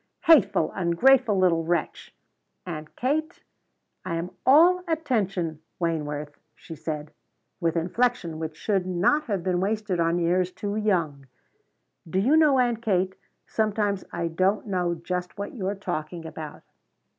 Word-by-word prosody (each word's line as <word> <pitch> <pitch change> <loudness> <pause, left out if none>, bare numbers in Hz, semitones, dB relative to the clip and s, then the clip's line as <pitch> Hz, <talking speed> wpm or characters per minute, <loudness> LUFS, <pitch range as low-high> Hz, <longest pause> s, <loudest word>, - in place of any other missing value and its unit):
"Hateful, 325 -4 +5
ungrateful 210 +6 +3
little 175 -3 +3
wretch!" 170 -1 -2 0.5
"Aunt 155 -3 -7
Kate?" 305 +5 -2 0.6
"I 185 -2 -3
am 170 +2 -4 0.2
all 340 +7 +6
attention, 195 - -1 0.2
Wayneworth," 150 -3 -3 0.2
she 165 - -10
said, 155 -1 -5 0.5
with 170 -2 0
inflection 175 -1 0
which 160 -1 -5
should 195 -4 0
not 185 +13 +2
have 200 -6 -2
been 180 -1 0
wasted 205 -1 -1
on 165 +1 +2
ears 180 +2 +1
too 205 +1 -4
young. 170 -10 0 0.8
"Do 185 - -2
you 245 +11 +4
know, 305 -4 +5
Aunt 240 -3 +1
Kate, 190 -4 +1 0.3
sometimes 210 -2 0
I 170 -1 -2
don't 185 +5 +1
know 180 -4 -1
just 180 +2 -4
what 200 0 -5
you're 200 -4 -3
talking 175 -3 -5
about." 155 -2 -8
185 Hz, 135 wpm, -25 LUFS, 165-215 Hz, 0.8 s, all